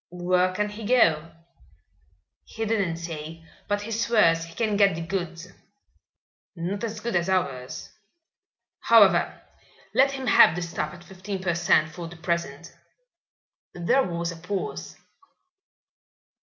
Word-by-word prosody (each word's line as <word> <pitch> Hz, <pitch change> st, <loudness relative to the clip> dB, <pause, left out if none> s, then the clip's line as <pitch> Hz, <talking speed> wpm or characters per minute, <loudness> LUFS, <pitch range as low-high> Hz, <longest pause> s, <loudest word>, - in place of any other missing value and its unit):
"Where 180 Hz, +1 st, +1 dB
can 210 Hz, +3 st, -1 dB
he 210 Hz, +2 st, -9 dB
go?" 165 Hz, -9 st, +3 dB, 1.1 s
"He 225 Hz, 0 st, -5 dB
didn't 200 Hz, -7 st, 0 dB
say, 165 Hz, -1 st, -7 dB, 0.2 s
but 205 Hz, 0 st, 0 dB
he 225 Hz, -, -7 dB
swears 210 Hz, -8 st, +2 dB
he 165 Hz, 0 st, -14 dB
can 220 Hz, -3 st, 0 dB
get 200 Hz, -4 st, +4 dB
the 165 Hz, -, -5 dB
goods." 175 Hz, 0 st, -4 dB, 1.1 s
"Not 190 Hz, +5 st, -4 dB
as 220 Hz, -2 st, -4 dB
good 235 Hz, -3 st, -3 dB
as 175 Hz, +1 st, +1 dB
ours. 140 Hz, -10 st, -2 dB, 0.9 s
However, -, -, +4 dB, 0.5 s
let 275 Hz, +1 st, +4 dB
him 265 Hz, -1 st, -5 dB
have 200 Hz, -7 st, +6 dB
the 175 Hz, -, -3 dB
stuff 170 Hz, +2 st, -4 dB
at 175 Hz, -, -14 dB
fifteen 190 Hz, +2 st, -7 dB
per 180 Hz, -2 st, -1 dB
cent. 170 Hz, -2 st, +2 dB
for 170 Hz, +1 st, -7 dB
the 175 Hz, +1 st, -11 dB
present." 170 Hz, -1 st, -4 dB, 1.0 s
There 205 Hz, +10 st, +2 dB
was 170 Hz, -5 st, -2 dB
a 170 Hz, -, -9 dB
pause. 185 Hz, +4 st, -5 dB
180 Hz, 135 wpm, -25 LUFS, 165-205 Hz, 1.1 s, have